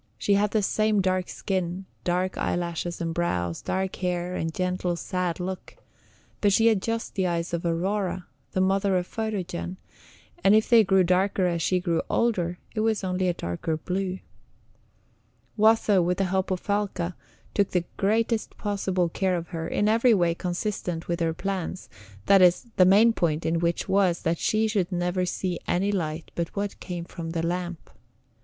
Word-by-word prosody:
She 200 - +1
had 205 +1 +3
the 215 0 +1
same 215 +1 +2
dark 185 -1 0
skin, 185 -1 -3 0.2
dark 180 +1 0
eyelashes 170 0 -2
and 165 -1 -2
brows, 90 - -1
dark 190 0 -2
hair, 180 -1 -2
and 165 -1 -2
gentle, 180 0 -1
sad 180 0 -2
look; 185 +1 -6 0.6
but 205 - +4
she 225 +3 +4
had 220 -4 +4
just 230 +1 -3
the 190 -2 0
eyes 170 0 -2
of 170 - -1
Aurora, 185 +1 -1 0.3
the 185 - +1
mother 195 0 +2
of 180 - -1
Photogen, 190 -4 -4 0.7
and 200 - +6
if 220 - +3
they 230 -2 +7
grew 190 -1 +4
darker 185 +2 +2
as 170 -2 0
she 180 +3 +2
grew 170 -2 0
older, 180 -7 +1 0.2
it 215 - -3
was 220 -2 +1
only 185 0 0
a 175 - +2
darker 85 - -3
blue. 185 +3 -2 1.4
Watho, 215 -3 +4
with 180 +1 0
the 195 - +1
help 190 +1 0
of 185 -2 -1
Falca, 195 -4 -1 0.4
took 200 -2 +2
the 180 -2 0
greatest 220 +3 0
possible 195 -3 0
care 185 +2 0
of 170 -1 -6
her 165 -2 -4
in 205 - +1
every 230 +2 +4
way 175 -3 +2
consistent 175 -1 -3
with 170 0 -1
her 165 -1 0
plans, 185 -1 -4 0.4
that 195 +5 +6
is, 180 +5 +5
the 185 - +6
main 210 +5 +6
point 160 -5 0
in 165 +1 +1
which 170 0 0
was 190 -3 +2
that 165 0 0
she 220 0 +2
should 200 -4 0
never 180 +1 0
see 180 0 -2
any 195 +3 +1
light 165 -4 -3
but 170 -1 -3
what 200 0 -3
came 175 -2 -5
from 170 -1 -7
the 165 0 -2
lamp. 175 -1 -4
185 Hz, 175 wpm, -26 LUFS, 175-200 Hz, 1.4 s, they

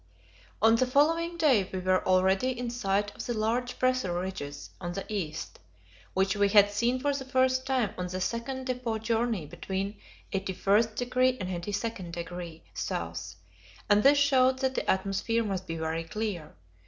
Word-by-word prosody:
On 225 +1 +6
the 255 - +2
following 330 +6 +2
day 260 - +3
we 190 - -3
were 185 0 +1
already 190 +7 +3
in 245 -1 -3
sight 205 -3 -1
of - - -6
the 240 - -1
large 235 +3 -1
pressure 255 -9 +1
ridges 180 -6 -6
on 175 -1 -4
the 195 - -4
east, 165 -7 -4 0.6
which 190 +2 +2
we 205 -1 +3
had 205 0 +6
seen 235 +5 +1
for 285 +2 +1
the 275 -1 -3
first 260 0 +1
time 250 -7 +1
on 180 - -2
the 185 +1 -4
second 240 +6 -3
depot 250 -3 -2
journey 225 -4 0
between 190 +5 -4 0.3
81° 220 +7 +1
and 180 -2 -4
82° 175 -5 -5 0.3
S., 85 +1 -4 0.6
and 205 0 +6
this 285 +4 +6
showed 260 -2 +4
that 265 0 0
the - - -2
atmosphere 195 +4 +1
must 190 -3 -3
be 165 - -3
very 160 +1 -2
clear. 180 -4 -4
210 Hz, 160 wpm, -29 LUFS, 185-255 Hz, 0.6 s, On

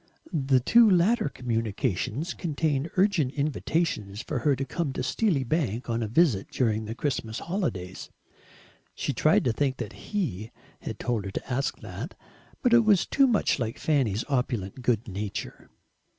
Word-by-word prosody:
The 135 -4 +3
two 230 - +6
latter 200 +2 +3
communications 115 - -2
contained 155 -2 -1
urgent 180 -9 +3
invitations 140 - -1
for 150 - -2
her 140 +3 +2
to 135 +2 -3
come 155 -2 -2
to 130 - -3
Steely 150 - +1
Bank 125 - -1
on 115 0 0
a 110 - -1
Visit 120 - +3
during 110 -3 0
the 110 +2 -5
Christmas 120 -5 -2
holidays. 135 - -3 0.9
She - - -2
tried - - +3
to 120 - +1
think 130 +2 0
that - - -5 0.2
HE 120 - -2 0.3
had - - -6
told 115 -4 -2
her 95 - -4
to 125 - -4
ask 135 +3 -1
that, 105 - -7 0.5
but 245 -3 +4
it 235 -1 +7
was 210 -4 +4
too 275 -1 +4
much 220 - +2
like 115 -2 -2
Fanny's 125 -9 +1
opulent 125 -5 -2
good 120 -2 +1
nature. 100 0 -5
130 Hz, 160 wpm, -27 LUFS, 110-165 Hz, 0.9 s, it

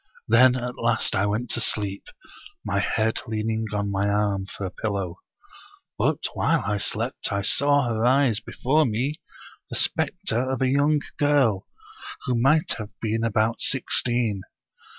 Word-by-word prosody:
Then 125 +3 +5
at 125 -1 -5
last 115 -1 +1
I 100 +2 +1
went 110 +4 -2
to 120 - 0
sleep, 100 -3 -1 0.6
my - - 0
head 110 +1 0
leaning 110 0 -2
on 100 -1 -2
my 100 +1 0
arm 100 -2 0
for 100 - -7
a 90 - -5
pillow. 100 -5 -4 0.8
But - - +1 0.2
while - - +1
I 105 0 0
slept - - -2
I 100 0 -1
saw 145 +3 +3
arise 120 +1 +2
before 135 +5 0
me 130 +8 -2 0.5
the - - -5
specter 130 -9 0
of 130 - -2
a - - +3
young 145 +2 +2 0.2
girl, 140 -9 +2 0.6
who 125 - 0
might 135 +7 +2
have 105 -1 -6
been 115 0 -2
about 110 0 0
sixteen. 120 -5 +2
115 Hz, 150 wpm, -24 LUFS, 105-130 Hz, 0.8 s, Then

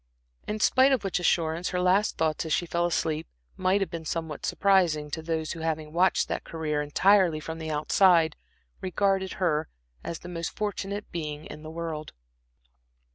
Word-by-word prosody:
In 215 +1 -2
spite 260 +5 +5
of 255 -6 +2
which 195 -2 -1
assurance, 170 -1 +1
her 180 - -1
last 185 +4 +2
thoughts 155 -1 0
as - - -5
she 175 - +1
fell 170 +1 0
asleep 160 -2 -1 0.3
might 185 +2 +2
have 185 -4 -1
been 165 -1 -5
somewhat 160 -1 -4
surprising 175 -7 +2
to 160 - -3
those 160 -1 -2
who, 170 - -6
having 155 -1 -3
watched 180 +2 +3
that - - -3
career 155 -2 -2
entirely 180 +2 +3
from 160 +1 -6
the 160 0 -5
outside, 160 +1 +4 0.5
regarded 190 0 0
her 155 -4 0 0.3
as 170 - -4
the 175 - -11
most 170 -2 -5
fortunate 205 -1 -3
being 150 -2 -5
in 150 - -9
the 155 - -8
world. 160 -2 -5
165 Hz, 175 wpm, -27 LUFS, 155-190 Hz, 0.5 s, spite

